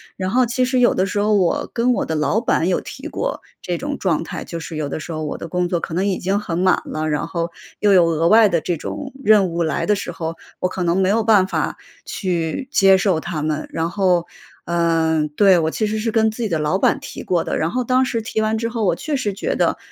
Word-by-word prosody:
然 185 -1 -3
后 250 +3 +3
其 240 +2 0
实 255 0 +1
有 240 - +4
的 185 - +1
时 205 - -2
候 210 +1 +2
我 185 -4 +1
跟 245 +1 +2
我 - - -1
的 160 - -3
老 155 +8 +1
板 180 -7 +1
有 185 - +1
提 - - -8
过 - - -3 0.2
这 175 -1 -3
种 285 +1 -4
状 165 -4 0
态， - - -6
就 170 - -6
是 165 0 -7
有 150 -2 -3
的 155 - -4
时 165 - -7
候 155 -1 -4
我 150 - -4
的 165 - -7
工 180 +1 -1
作 175 -1 0
可 160 - -6
能 185 +3 0
已 195 - 0
经 195 +2 0
很 170 -5 -4
满 185 0 +3
了， 155 0 -3
然 150 -1 -1
后 170 -1 -3 0.3
又 205 -1 +4
有 175 -2 +6
额 165 0 +1
外 215 +2 +6
的 170 -3 +1
这 175 -2 -2
种 270 - -6
任 210 -3 +5
务 170 +1 -2
来 160 - -1
的 210 - +2
时 195 - -5
候， 165 0 -5 0.2
我 185 - +1
可 185 - -5
能 175 +1 +1
没 190 -1 +2
有 220 +2 +2
办 210 -4 +5
法 - - -2 0.3
去 180 - -2
接 195 -6 +5
受 190 -4 +1
他 160 -1 -4
们。 155 0 -2
然 165 +1 -1
后， 180 -3 +1 0.4
嗯 165 -2 +1
对， 190 +4 +4
我 160 -1 0
其 215 +4 -1
实 215 +1 -2
是 225 +1 -1
跟 220 -1 +3
自 230 +2 -5
己 215 - -1
的 160 - 0
老 150 +5 +1
板 - - +2
提 - - -8
过 175 -2 0
的， - - -2
然 160 +2 -1
后 255 - -1
当 255 +2 +2
时 230 -2 -2
提 220 0 -2
完 220 0 0
之 230 0 -2
后， 230 -3 -2
我 175 - +2
确 300 - -3
实 215 -7 -1
觉 195 - -2
得， - - +1
185 Hz, 285 characters per minute, -20 LUFS, 165-220 Hz, 0.4 s, 有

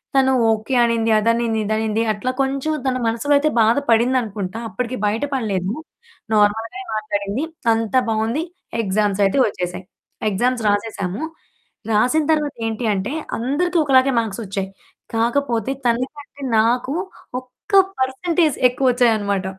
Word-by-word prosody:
తను 265 0 +4 0.2
ఓకే 220 +4 -2
అనింది 230 -1 +1
అదనింది 230 0 +1
ఇదనింది, 220 +1 0
అట్లా 250 +5 -2
కొంచుం 275 +3 -1
తన 255 - +1
మనసులో 235 +6 +1
అయితే 305 +2 +2
బాధ 225 +4 +4
పడిందనుకుంటా. 225 -4 +1
అప్పడికి 250 0 -3
బయట 215 +5 0
పడలేదు, 200 -5 -1 0.6
నార్మల్‌గానే 220 - +1
మాట్లాడింది. 210 +4 -2 0.3
అంతా 225 +3 +1
బావుంది. 225 +8 0 0.4
ఎగ్జామ్సయితే 200 +1 +1
ఒచ్చేశాయి. 180 -1 -4 0.4
ఎగ్జామ్స్ 240 +4 0
రాసేశాము. 205 - -2 0.7
రాసిన 250 +9 +3
తర్వాత 300 -2 0
ఏంటి 225 +1 -3
అంటే, 200 +9 -2 0.2
అందరికి 300 +9 0
ఒకలాగే 270 -1 +4
మార్క్సొచ్చాయి. 195 -3 -3 0.5
కాకపోతే, 235 +1 0
తనకంటే 275 +4 -3 0.2
నాకు 245 +5 +1 0.5
ఒక్క 255 +11 -19 0.3
పర్సంటేజ్ 310 +4 +1
ఎక్కువొచ్చాయనమాట. 230 -7 +1
230 Hz, 110 wpm, -20 LUFS, 210-265 Hz, 0.7 s, తను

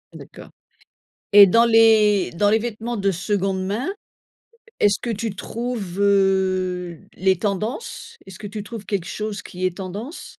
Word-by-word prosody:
D'accord - - -12 0.8
et 200 -1 +10
dans 230 +5 +4
les 220 -4 +4
dans 205 +4 +1
les 220 - +4
vêtements 235 +1 -4
de 195 -1 +1
seconde 190 0 -2
main, 220 - -2 0.9
est-ce 205 -1 +3
que 240 - -4
tu 225 -1 -3
trouves, 220 -4 -5
heu, 185 -3 +1 0.2
les 190 0 +2
tendances? 215 - -4
Est-ce 190 - -11
que 210 - -9
tu 210 +1 -6
trouves 215 -2 -9
quelque 195 -4 -3
chose 210 -1 -5
qui 185 -1 -5
est 180 -1 -2
tendance? 205 - -7
200 Hz, 150 wpm, -22 LUFS, 190-220 Hz, 0.9 s, et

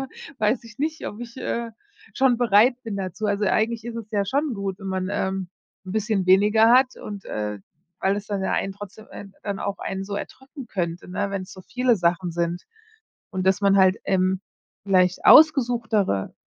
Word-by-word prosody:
W 270 - -4 0.3
weiß 220 +3 +1
ich 230 0 -14
nicht, 315 +2 -2
ob 210 - -7
ich, 240 +1 -9
äh, 235 -2 -3 0.4
schon 260 -3 +3
bereit 240 +2 +4
bin 210 -3 -4
dazu. 195 +2 -4
Also, 205 0 0
eigentlich 225 +2 0
ist 235 -1 -6
es 220 -1 -8
ja 200 -1 +1
schon 280 +3 -1
gut, 195 -1 -4
wenn 195 - -9
man, 185 0 -2
ähm, 190 -2 -2 0.4
'n 185 - -7
bisschen 215 -3 0
weniger 210 +4 +5
hat 255 0 +4
und, 205 -2 -8
äh 105 -1 -4 0.4
weil 195 +1 +1
es 205 - -6
dann 200 -2 -3
ja - - -1
einen 195 - -1
trotzdem 205 +2 -11
ein 200 -1 -10
dann 200 -2 -3
auch 200 0 -3
einen 190 0 -4
so 200 - -5
erdrücken 265 +2 -9
könnte, 175 -4 -4
ne, 200 +2 -2
wenn's 190 -1 -5
so 185 - -12
viele 250 +2 +1
Sachen 175 0 0
sind. 170 +1 -2 0.7
Und 190 -2 -3
dass 190 +1 +3
man 195 0 +4
halt, 190 +1 +4
ähm, 185 0 +1 0.4
vielleicht 185 -2 +2
ausgesuchtere 235 - +4
200 Hz, 195 wpm, -24 LUFS, 190-230 Hz, 0.7 s, weniger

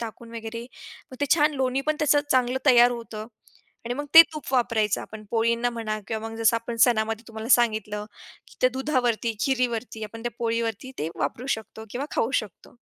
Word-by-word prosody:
टाकून 230 0 -8
वगैरे 230 +1 -6 0.5
मग - - -8
ते 285 - +1
छान 305 -1 +2
लोणी 260 -1 0
पण 310 0 +1
त्याचं 295 -1 +3
चांगलं 255 0 +2
तयार 245 -2 +7
होतं 230 -3 -6 0.6
आणि 240 +1 -3
मग 290 +3 -4
ते 330 - +13
तूप 305 -3 -7
वापरायचं 230 -5 +1
आपण 215 0 -10
पोळींना 235 +1 +1
म्हणा 225 -2 -3
किंवा 225 0 -4
मग 225 - -8
जसं 225 0 +3
आपण 230 +1 -5
सणामध्ये 225 -1 0
तुम्हाला 220 0 -7
सांगितलं, 215 -3 -1 0.4
की - - -19
त्या 255 - +4
दुधावरती, 250 -4 0
खिरीवरती 245 -4 -1
आपण 225 +2 -9
त्या 240 - -2
पोळीवरती 230 +1 -2
ते 155 - -2
वापरू 155 - -3
शकतो 220 0 -11
किंवा 260 +5 -4
खाऊ 230 - +1
शकतो. 205 -6 -14
230 Hz, 180 wpm, -25 LUFS, 220-255 Hz, 0.6 s, ते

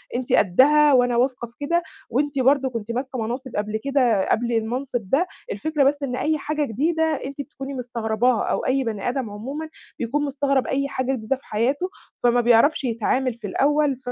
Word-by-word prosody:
أنتِ 250 0 -1
قدّها، 285 +10 +5
وأنا 245 -1 +3
واثقة 250 -1 0
في 235 - -23
كده، 340 +4 +1 0.3
وأنتِ 275 +3 0
برضو 265 +1 +3
كنتِ 230 -1 -4
ماسكة 255 +1 -3
مناصب 245 +3 -4
قبل 210 +1 -1
كده 250 -8 +2
قبل 235 +1 +1
المنصب 235 -1 -2
ده، 340 +7 +2 0.3
الفكرة 310 -2 0
بس 285 +1 +3
إن 250 -2 -2
أي 310 0 +1
حاجة 300 0 -2
جديدة 315 +8 0 0.2
أنتِ 280 +1 -5
بتكوني 275 -1 -8
مستغرباها، 235 -1 0
أو - - -1
أي 265 +1 +2
بني 220 0 -2
آدم 250 -4 -2
عمومًا 275 +10 -6 0.3
بيكون 290 +5 -1
مستغرب 275 -1 0
أي 275 +1 0
حاجة 260 0 -1
جديدة 230 +3 -1
في 275 - -25
حياته، 270 - 0 0.3
فما 240 0 +4
بيعرفش 240 +6 +4
يتعامل 245 +2 0
في 220 -3 -7
الأول، 290 +4 +2
260 Hz, 180 wpm, -23 LUFS, 235-285 Hz, 0.3 s, قدّها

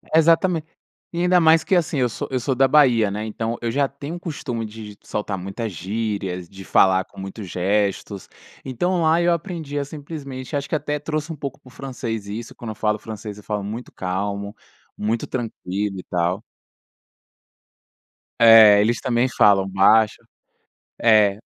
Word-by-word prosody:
Exatamen 165 +1 +4 0.5
e 170 - -1
ainda 180 0 +4
mais 160 -1 +5
que 190 - +1
assim, 160 -5 +1
eu 125 -1 +2
sou - - -5
eu 130 - 0
sou 130 +2 -1
da 135 +1 +4
Bahia 125 -8 +4
né, 105 +2 -3
então 115 +1 -3
eu 115 - -1
já 140 +2 +1
tenho 140 +4 -7
o 175 - -7
costume 130 -9 -4
de 105 -1 -9
de - - -39
soltar 105 -2 -3
muitas 100 +4 -5
gírias, 95 -1 -4
de 95 -1 -11
falar 95 0 +4
com - - -15
muitos 95 +1 -7
gestos, 100 +2 -1 0.4
então 175 +7 0
lá 160 +2 +3
eu 175 0 +3
aprendi 165 -4 -3
a 140 - -1
simplesmente 145 -2 -7
acho 140 0 -2
que - - -1
até 150 0 -2
trouxe 155 +1 -3
um - - -5
pouco 140 -2 -6
para - - -22
o 125 - -14
francês 120 -6 -5
isso, 110 +3 -7
quando 115 - -8
eu - - -8
falo 105 0 0
francês 105 -1 -8
eu 105 - -13
falo 105 -1 -3
muito 110 +4 -6
calmo, 100 +2 -3 0.4
muito 110 +2 -1
tranquilo 105 -5 -4
e - - -8
tal. 90 +3 -1 2.0
É 110 -3 +8
eles 115 +2 +1
também 120 0 +1
falam 100 -4 +4
baixo, 105 +3 +4 0.8
é. 105 -3 +4
115 Hz, 175 wpm, -22 LUFS, 100-140 Hz, 2.0 s, É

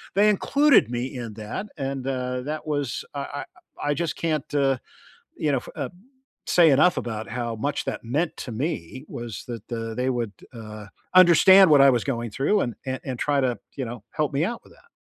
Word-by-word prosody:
they 210 +2 +5
included 280 - +4
me 125 +2 -3
in 115 -3 -6
that 110 - -6
and, 135 -2 -3
uh, 125 -1 -2
that 155 +3 -4
was 145 -4 -2
I 140 - -3
I 145 +1 -5 0.4
I - - +3
just 170 +1 -2
can't, 155 -3 -2
uh, 135 -2 +3 0.6
you 150 - 0
know, 135 - +2
f - - -11
uh - - -3 0.6
say 170 -2 +6
enough 150 +6 +4
about 110 -2 -4
how 120 -2 -3
much 145 +6 -2
that - - -4
meant 150 +9 -1
to 125 - -6
me 130 - -4
was 120 -3 -7
that, 120 -2 -8
uh, 115 -1 -4
they 125 +1 0
would, 120 -4 -2 0.2
uh, 110 -2 -9 0.3
understand 185 +1 +8
what 145 -2 +7
I 140 - +8
was 120 -3 +2
going 120 -4 -2
through 140 - +1
and 120 - -2
a 130 0 -3
and 130 -3 -4
try 145 +2 +1
to, 125 -3 0 0.2
you 135 - -3
know, 115 -2 -7
help 150 -2 -1
me 140 +3 +1
out 235 +2 -4
with - - -19
that. - - -24
135 Hz, 210 wpm, -24 LUFS, 120-150 Hz, 0.6 s, understand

